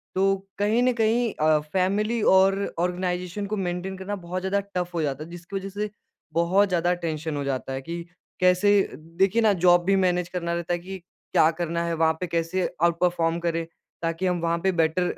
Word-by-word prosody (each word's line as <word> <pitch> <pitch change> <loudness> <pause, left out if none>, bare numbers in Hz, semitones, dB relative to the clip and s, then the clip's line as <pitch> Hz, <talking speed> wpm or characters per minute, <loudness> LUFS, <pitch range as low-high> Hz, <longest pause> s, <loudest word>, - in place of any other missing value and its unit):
तो 195 +1 +3 0.2
कहीं 215 +4 +2
न 255 0 +3
कहीं 230 0 +1
अ, 155 0 +3
फैमिली 210 +5 +1
और 195 +1 +4 0.2
आर्गेनाइज़ेशन 180 +2 -2
को 215 +2 -2
मेंटेन 185 0 -3
करना 190 +2 -4
बहुत 185 +1 -3
ज़्यादा 190 +2 0 0.2
टफ 180 -1 -2
हो 170 - -1
जाता 145 -1 -2
है, 160 - -11
जिसकी 175 +3 -9
वजह 195 0 -3
से 205 +2 -3 0.4
बहुत 175 +5 +3
ज़्यादा 175 -1 +2
टेंशन 160 -3 -3
हो 145 - -2
जाता 135 -1 -3
है 135 - -4
कि 170 +4 -5 0.4
कैसे 180 +2 +4 0.2
देखिए 180 - 0
ना 220 -2 +5
जॉब 175 -1 +6
भी 195 +1 +3
मैनेज 180 -2 +1
करना 170 -2 -3
रहता 170 0 -2
है 175 - -1
कि 190 +2 -7
क्या 170 -2 +1
करना 170 0 -2
है 170 - -1
वहाँ 160 0 +2
पे, 180 - -3
कैसे 170 +2 -1 0.2
और 170 0 +5
परफॉर्म 170 -2 +1
करें, 165 -1 -1 0.4
ताकि 165 +2 -2
हम 180 -1 +1
वहाँ 170 0 +1
पे 190 - +3
बेटर 170 +1 +1
180 Hz, 200 wpm, -25 LUFS, 170-190 Hz, 0.4 s, जॉब